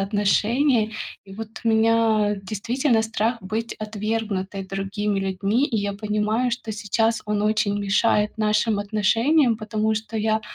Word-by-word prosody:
отношения. 215 +4 +2 0.3
И 195 -1 -12
вот 220 +1 -6 0.2
у - - +2
меня 220 -2 +3
действительно 225 +5 0
страх 225 +2 -1
быть 220 +4 -3
отвергнутой 210 -2 -3
другими 195 +2 -2
людьми, 195 +6 0
и 240 - -2
я 200 -1 -1
понимаю, 215 +4 0
что 230 -2 -4
сейчас 220 +2 0
он 210 -1 0
очень 210 -1 +1
мешает 210 +1 +1
нашим 215 0 +2
отношениям, 225 +6 +2
потому 215 0 -1
что 220 +1 -5
я 220 0 +1
215 Hz, 135 wpm, -23 LUFS, 205-225 Hz, 0.3 s, меня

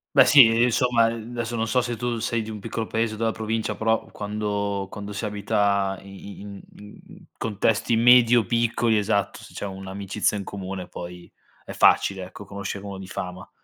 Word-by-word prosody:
Beh, - - +8
sì, 135 -5 +9
ehm, 115 +1 +3
insomma, 120 -1 +3
ehm, 115 0 -6
n 120 - -8
adesso 120 0 -3
non 115 0 -1
so 125 - +3
se 120 -1 -3
tu 120 0 -2
sei 115 0 -1
di 110 - -7
un 105 -1 -6
piccolo 115 +2 -4
paese 110 0 -1
della 115 0 0
provincia, 110 -1 -2
però 110 +1 +1
quando 100 -1 -3
quando 105 -1 -7
si 100 - -5
abita 100 -1 0
i 100 +1 -11
i - - -10
in 100 -1 -9
in 105 0 -13
in - - -15
contesti 115 +1 0
medio 120 -1 +6
piccoli, 115 0 +1
esatto, 100 -1 0
se - - -14
c'è - - -5
un'amicizia 95 +2 -2
in 100 - -3
comune 95 -2 -6
poi 90 0 -9 0.3
è - - -9
facile, 95 -2 +3
ecco, 95 +2 -11
conoscere 100 0 -6
uno 100 -1 -6
di 95 -1 -9
fama. 90 -1 -6
105 Hz, 200 wpm, -24 LUFS, 100-115 Hz, 0.3 s, sì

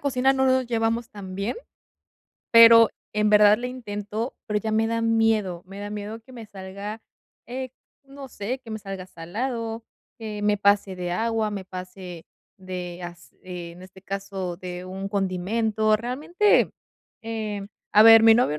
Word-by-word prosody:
cocina 265 -2 +2
no 265 0 +2
nos 260 -1 +2
llevamos 230 0 -1
tan 190 -3 -9
bien. 200 - -3 1.0
Pero, 230 -1 +9 0.3
en 210 0 +2
verdad 210 0 +6
le 250 +1 -4
intento, 220 -1 -5
pero, 210 -1 0
ya 220 +1 -3
me 220 +1 +2
da 230 0 -1
miedo. 225 -6 +1
Me 195 +1 -9
da 205 - -6
miedo, 210 +2 -6
que 260 +3 -18
me 230 -3 -9
salga, 200 +2 -8 0.4
eh, 255 +1 -5 0.3
no 275 0 -11
sé, 245 +3 -4
que 235 - -12
me 220 - -4
salga 195 -2 -7
salado, 225 +6 -4 0.3
que 215 -2 -6
me 210 0 +2
pase 200 -1 +2
de 180 -1 -4
agua, 225 +1 0
me 200 -2 -5
pase 180 -2 -9 0.3
de 180 -1 -6
as 175 0 -10
eh, 175 -2 -7
en 175 +2 -14
este 190 0 -15
caso 195 -2 -5
de 180 0 -7
un 190 +1 -6
condimento. 215 +3 +1
Realmente, 300 - +2 0.5
eh, 215 -3 -4 0.3
a 210 - +8
ver, 225 0 +9
mi 225 0 +8
novio, 220 -11 +2
210 Hz, 165 wpm, -24 LUFS, 190-230 Hz, 1.0 s, Pero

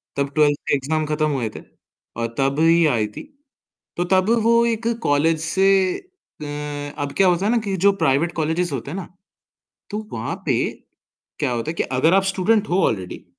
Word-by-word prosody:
तब 140 0 -1
ट्वेल्थ 145 -2 +3
के - - +3
एग्ज़ाम 155 +3 -1
ख़त्म 155 0 0
हुए 120 -6 -1
थे - - -7 0.6
और 115 0 -3
तब 135 +2 0
ही 165 0 +4
आई 115 -6 +1
थी - - -6 0.7
तो 175 - +1
तब 185 +3 +3
वो 235 +1 +4
एक 230 0 -1 0.2
कॉलेज 155 +3 +2
से 190 +4 +2 0.7
अ, - - -5 0.6
अब 140 - -5
क्या 195 -1 +5
होता 180 +2 +2
है 220 - +2
ना 240 - +3
कि 195 -1 -1
जो 200 - +7
प्राइवेट 140 +6 +2
कॉलेजेस 165 +2 0
होते 135 +2 -5
हैं - - -5
ना 190 - -6 0.8
तो 210 - -2
वहाँ 110 0 -3
पे - - +2 0.8
क्या - - 0
होता 120 +6 -2
है - - -6
कि - - 0
अगर 135 +7 +1
आप 195 0 +4
स्टूडेंट 200 +3 +1
हो 185 +2 +2
ऑलरेडी 95 -4 -4
160 Hz, 195 wpm, -21 LUFS, 140-190 Hz, 0.8 s, जो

